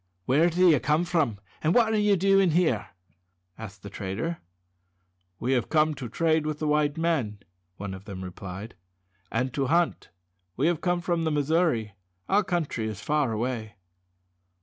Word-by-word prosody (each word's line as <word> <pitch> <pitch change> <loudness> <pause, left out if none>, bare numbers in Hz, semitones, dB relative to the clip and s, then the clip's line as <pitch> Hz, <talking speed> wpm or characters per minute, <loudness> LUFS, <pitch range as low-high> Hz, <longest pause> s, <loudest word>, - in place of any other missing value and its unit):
"Where 155 +7 +4
do 180 +2 +4
you 155 -5 +6
come 150 +6 +1
from, 155 - 0 0.2
and 160 +2 +2
what 225 -2 +4
are 215 - +2
you 210 -1 +4
doing 195 0 +4
here?" 155 - +1 0.7
asked 100 -3 -10
the 100 - -7
trader. 105 - -4 1.0
"We 130 +3 0
have 125 -3 0
come 155 -1 +3
to 130 -4 -7
trade 160 +4 +1
with 155 -1 -2
the 155 - -2
white 150 0 +1
men," 155 -11 0 0.4
one 100 -1 -5
of 95 +1 -10
them 95 -2 -7
replied, 95 +4 -7 0.6
"and 125 +2 -1
to 135 -2 0
hunt. 170 +3 +1 0.5
We 135 - +1
have 170 -2 +1
come 175 -1 0
from 170 -1 0
the 160 - +1
Missouri. 145 - +1 0.3
Our 205 +2 +3
country 165 -12 -2
is 105 -2 -5
far 145 +2 0
away." 110 -2 -3
150 Hz, 170 wpm, -27 LUFS, 110-170 Hz, 1.0 s, you